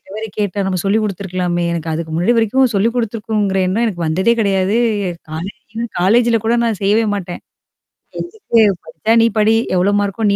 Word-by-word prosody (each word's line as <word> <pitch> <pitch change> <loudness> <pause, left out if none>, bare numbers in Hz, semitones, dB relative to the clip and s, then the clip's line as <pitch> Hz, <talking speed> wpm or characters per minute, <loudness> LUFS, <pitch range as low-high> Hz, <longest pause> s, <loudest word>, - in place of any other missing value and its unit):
இவ - - -21
வேற 220 +1 -4
கேட்டா, 205 -1 -1
நம்ம 185 -1 -1
சொல்லிக் 210 +3 +2
குடுத்துருக்கலாமே!" 180 -3 -2
எனக்கு 165 -1 -4
அதுக்கு 160 0 -4
முன்னாடி 180 +9 +2
வரைக்கும் 250 +3 +2
சொல்லிக் 220 +4 +1
குடுத்துருக்குங்கிற 215 -4 -1
எண்ணம் 215 +6 0
எனக்கு 180 -6 -3
வந்ததே 190 +9 +2
கிடையாது. 195 0 +1 0.5
காலே 165 +5 -5 0.5
காலேஜ்ல 230 +5 +3
கூட 230 +1 +2
நான் 225 -4 -1
செய்யவே 210 +3 +3
மாட்டேன். 180 -3 -5 0.8
எதுக்கு? 345 - 0 0.2
படிச்சா, 190 +7 -3
நீ - - +5
படி. 215 +1 +4 0.2
எவ்வளோ 185 +3 +2
மார்க்கோ? 205 +2 -2
நீ 200 - +2
200 Hz, 170 wpm, -17 LUFS, 185-225 Hz, 0.8 s, நீ